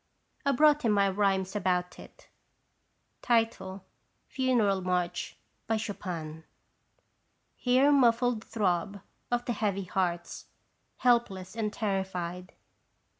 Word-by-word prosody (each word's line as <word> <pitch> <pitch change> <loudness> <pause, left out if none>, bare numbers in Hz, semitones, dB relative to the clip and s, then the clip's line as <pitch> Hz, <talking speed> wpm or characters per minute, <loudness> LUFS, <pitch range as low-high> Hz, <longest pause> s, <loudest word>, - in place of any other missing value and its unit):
I - - +5
brought 300 +2 +4
him 225 -3 +2
my 200 -1 +3
rhymes 195 0 0
about 180 -2 -1
it. - - -15 0.9
FUNERAL 225 0 -1
MARCH. 180 -1 -2 0.4
Chopin. 170 -7 -5 1.1
Hear 260 +3 +3
muffled 245 -4 +3
throb 200 -2 -1 0.3
of 245 0 -1
the 240 - -1
heavy 200 -3 -1
hearts, 175 -2 -2 0.5
helpless 220 -6 +1
and 215 -2 -1
terrified. 185 -4 -3
200 Hz, 90 wpm, -29 LUFS, 185-235 Hz, 1.1 s, I